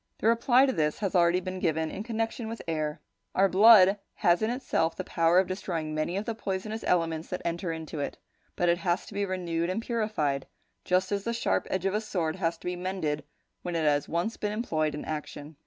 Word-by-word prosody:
The - - -6
reply 240 +3 +5
to 265 - 0
this 150 -5 0
has 200 -3 -2
already 175 +1 +4
been 185 0 -5
given 160 -2 0
in - - -5
connection 225 +1 -3
with 230 - -6
air. 155 -2 -2 0.4
Our 195 +1 +5
blood 200 0 +7 0.2
has 175 +2 +3
in 220 - +1
itself 240 -10 0
the - - -4
power 165 +1 +2
of 190 - +5
destroying 170 -4 -3
many 155 +4 -1
of 205 - -2
the 230 - -2
poisonous 215 +1 -4
elements 165 -2 +1
that 180 - -5
enter 170 +1 -2
into 160 -1 -6
it, 140 - -3 0.4
but 175 - +1
it 170 0 +3
has 175 -1 0
to - - -11
be 200 0 0
renewed 170 -2 -2
and 185 - -1
purified, 215 - -1 0.4
just 185 +1 +1
as 200 -1 -1
the 235 - -2
sharp 235 - 0
edge 190 0 -1
of 195 - +1
a 210 - 0
sword 175 -6 -2
has 170 -3 -1
to - - -17
be 180 0 -1
mended 175 -5 -2 0.4
when 175 -1 -4
it 160 -2 0
has 145 -1 +2
been - - -10
once 175 +7 0
employed 205 -9 -1
in 150 - -6
action. 150 0 -6
180 Hz, 220 wpm, -28 LUFS, 160-210 Hz, 0.4 s, blood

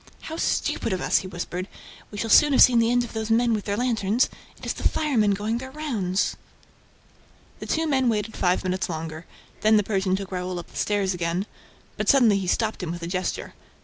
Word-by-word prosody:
"How 320 - -6
stupid 230 - 0
of 185 - -2
us!" - - +3
he 185 - -7
whispered. 180 +1 -5 0.4
"We 205 - -9
shall 225 +1 -2
soon 295 -1 +7
have - - +5
seen 245 -2 +5
the 230 0 +3
end 245 0 +3
of 240 - -8
those 220 0 -3
men 230 +1 +3
with 210 -2 -2
their 205 0 -1
lanterns. 230 -1 +1 0.3
It - - -11
is - - -1
the - - 0
firemen 225 -10 +1
going 215 +4 -2
their 260 +1 -7
rounds." 230 -11 -1 1.2
The - - -7
two 325 +1 0
men 265 -5 +2
waited 215 0 -2
five 180 0 +1
minutes 185 0 -2
longer. 160 0 -6 0.3
Then 215 0 +4
the 210 - +3
Persian 190 -2 0
took 195 0 -6
Raoul 180 0 -3
up 175 - -8
the - - -18
stairs 200 -2 0
again; 175 +2 -2 0.5
but - - -1
suddenly 235 -8 +5
he 190 - -4
stopped 220 +3 0
him 180 - -4
with 175 0 -6
a - - -3
gesture. 185 +1 -3
205 Hz, 215 wpm, -24 LUFS, 185-235 Hz, 1.2 s, soon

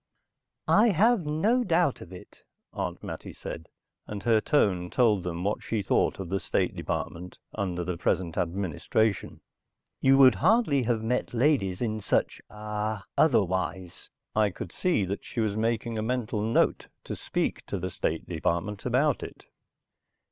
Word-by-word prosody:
"I 225 - +5
have 210 -1 +3
no 210 +12 +2
doubt 170 - +1
of 90 - -11
it," 90 - -13 0.3
Aunt - - -4
Mattie - - -7
said, 80 - -8 0.4
and 100 -2 -6
her 115 -2 +3
tone 95 - +1
told 110 -5 +3
them 85 0 -4
what 100 +2 -1
she 110 -3 -2
thought - - +1
of 95 -3 -5
the 95 +1 0
State - - -1
Department 90 +2 -4 0.2
under 90 -4 -2
the 90 0 -3
present 85 -1 0
administration. 95 +4 -1 0.6
"You 135 0 +5
would 130 -2 +8
hardly 185 - +4
have 115 -2 0
met 125 +1 -1
ladies 120 -7 +2
in 110 -2 -2
such - - 0
ah 105 0 -4
otherwise." 95 - 0 0.3
I 105 -1 +3
could 90 -2 -7
see 170 - +1
that 100 +2 -4
she - - -6
was 110 -2 0
making 115 0 -1
a - - -1
mental 115 -2 -1
note 110 +2 +1 0.2
to - - -5
speak - - -2
to 100 - -3
the 90 0 -4
State 80 -2 -2
Department 90 +6 -2
about 130 +3 +2
it. - - -9
110 Hz, 155 wpm, -27 LUFS, 95-125 Hz, 0.6 s, would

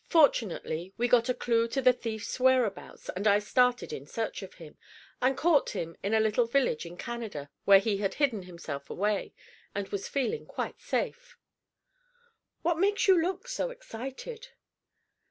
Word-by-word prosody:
Fortunately, 195 - +2
we 240 - +2
got 240 0 +4
a - - +3
clue 230 -1 +1
to 250 +4 -2
the 255 -1 +6
thief's 225 -1 -5
whereabouts, 255 -5 +1
and 200 +4 -1
I 205 0 +6
started 245 -1 +2
in 140 0 -7
search 225 +6 -3
of 195 - -10
him, 160 -3 -12 0.5
and 260 +1 +2
caught 315 -3 +3
him 165 0 -4
in 205 +3 0
a - - +4
little 220 +2 +2
village 235 - +1
in 175 +1 -10
Canada 215 -13 -6
where 200 -1 +9
he 200 +1 +1
had 195 -1 -1
hidden 255 -9 +1
himself 170 -6 -7
away, 205 +1 -1 0.4
and 200 -1 -3
was 200 -1 -3
feeling 285 - -1
quite - - -5
safe - - -3 1.3
What 335 -1 +1
makes 405 +2 +2
you 370 -3 +6
look 370 +7 -2
so - - -2
excited?" 460 - -8
230 Hz, 165 wpm, -29 LUFS, 200-280 Hz, 1.3 s, where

